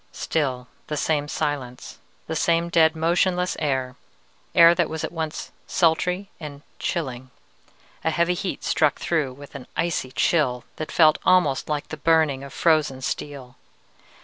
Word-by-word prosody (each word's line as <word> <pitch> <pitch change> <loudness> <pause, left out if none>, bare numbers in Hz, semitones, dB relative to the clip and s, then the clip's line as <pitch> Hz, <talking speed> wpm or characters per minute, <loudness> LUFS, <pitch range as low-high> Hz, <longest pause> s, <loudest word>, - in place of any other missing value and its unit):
"Still 130 -5 -2 0.2
the 150 - -3
same 145 -1 0
silence, 130 -4 -4 0.3
the 160 - -4
same 170 +1 +1
dead, 160 -1 +4
motionless 180 +2 +1
air 130 -4 -1 0.6
air 170 0 +8
that 175 -2 0
was 160 0 -4
at - - -3
once 160 -2 -5 0.2
sultry 180 +3 +1
and 145 -2 -9 0.2
chilling: 130 -7 -3 0.7
a 160 - +2
heavy 170 +2 +1
heat 180 +1 -4
struck 150 -2 +2
through 155 -6 -1
with 140 +2 -13
an 140 -2 -9
icy 165 -6 -1
chill 130 -5 +1
that 155 - -5
felt 155 -2 +5
almost 165 -8 +3
like 150 -1 -2
the 155 - -6
burning 155 -3 +2
of 140 - -9
frozen 155 -5 +1
steel. 130 -2 -5
155 Hz, 145 wpm, -24 LUFS, 140-170 Hz, 0.7 s, air